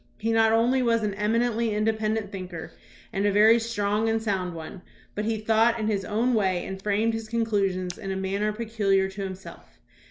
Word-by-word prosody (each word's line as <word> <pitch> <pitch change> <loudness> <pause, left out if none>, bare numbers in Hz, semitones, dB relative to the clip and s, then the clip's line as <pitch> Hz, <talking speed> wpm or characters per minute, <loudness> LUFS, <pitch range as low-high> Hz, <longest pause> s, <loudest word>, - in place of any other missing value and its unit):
He 225 +1 -1
not 225 0 +4
only 240 +4 +3
was 230 -2 +2
an 205 -1 -1
eminently 225 +2 0
in 210 - 0
dependent 220 -1 -1
thinker 185 -4 -7 0.4
and 195 +1 +1
a - - +2
very 215 +3 +6
strong 220 -1 0
and 225 0 +1
sound 190 -5 -2
one, 165 +3 -8 0.3
but 210 - -3
he 225 0 0
thought 225 +2 +2
in 215 - -1
his 205 -3 0
own 230 +5 0
way 190 -5 +1
and 190 0 -6
framed 210 +3 +1
his 225 -1 -5
con 230 0 0
clusions 190 -4 -1
in 195 - -6
a - - -2
manner 195 +2 -1
peculiar 210 -3 0
to 195 +1 -7
himself. 190 0 -9
215 Hz, 200 wpm, -26 LUFS, 195-225 Hz, 0.4 s, very